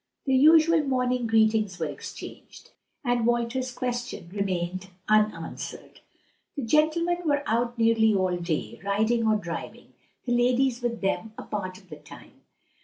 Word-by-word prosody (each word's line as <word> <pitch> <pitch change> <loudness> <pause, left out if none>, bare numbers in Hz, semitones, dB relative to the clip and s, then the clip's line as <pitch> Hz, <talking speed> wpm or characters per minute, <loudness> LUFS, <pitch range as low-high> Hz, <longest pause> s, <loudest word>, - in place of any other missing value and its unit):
The 270 - +1
usual 315 +4 +6
morning 250 -3 0
greetings 220 -3 +2
were - - -2
exchanged, - - -9 0.3
and 245 -1 +1
Walter's 240 +2 0
question 245 -8 -4
remained 185 -2 -2 0.2
unanswered. 215 -6 -1 0.6
The 280 - -3
gentlemen 315 +7 +2
were 290 -3 +1
out 235 +2 0
nearly 225 -1 +4
all 185 -2 +1
day, 170 -3 -3
riding 220 +3 +1
or 215 - +4
driving; 170 -5 -6 0.3
the 245 - -2
ladies 250 +1 +2
with 235 -2 -2
them 215 +3 -1
a - - -6
part 185 -3 -5
of 190 -1 -20
the 150 - -7
time. - - -14
230 Hz, 140 wpm, -26 LUFS, 200-255 Hz, 0.6 s, usual